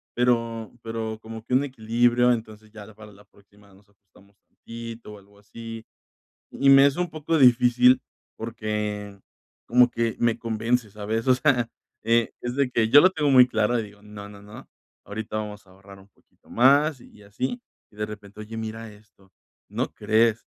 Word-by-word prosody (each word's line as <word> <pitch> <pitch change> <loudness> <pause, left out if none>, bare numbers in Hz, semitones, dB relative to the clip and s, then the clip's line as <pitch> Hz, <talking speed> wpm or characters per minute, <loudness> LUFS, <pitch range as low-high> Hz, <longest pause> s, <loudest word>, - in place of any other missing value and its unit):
pero 115 -2 0
pero 110 -1 -5
como 110 0 -9
que 125 - -6
un 130 +2 +4
equilibrio, 120 0 +2
entonces, 110 -2 -5
ya 110 -1 -12
para 105 0 -13
la 100 +1 -19
próxima 100 0 -24
nos 100 +2 -23
ajustamos 100 0 -26
tantito 115 -1 -10
o - - -11
algo 100 +1 -23
así. 115 +2 -10 0.7
Y 140 - +2
me 135 0 +8
es 140 - -1
un 180 0 -1
poco 155 +1 -2
difícil 125 -1 +5 0.4
porque 105 -3 -5 0.5
como 125 +1 +5
que 115 -1 -1
me 115 -1 +1
convence, 115 0 -1
¿sabes?, 110 +3 -4
o 130 - +5
sea, 125 -3 +1 0.3
eh, 115 0 +2
es 120 0 -4
de 135 -2 0
que 115 -2 +1
yo 145 +5 +8
lo 185 - +6
tengo 150 -5 0
muy 125 -1 +7
claro 115 0 0
y - - -3
digo: 100 -1 -14
"No, 105 -1 -11
no, 100 -1 -13
no. 105 +1 -13 0.4
Ahorita 110 +1 -5
vamos 105 -1 -7
a - - -19
ahorrar 95 +1 -16
un 95 - -19
poquito - - -31
más", 140 +3 +3
y 105 - -18
así. 125 - -4 0.3
Y, - - -23
de 105 - -2
repente: 105 -1 -11
"Oye, 110 +1 -8
mira 110 0 -6
esto, 105 -2 -23 0.4
¿no - - -3
crees 115 +1 +1
115 Hz, 180 wpm, -24 LUFS, 105-120 Hz, 0.7 s, me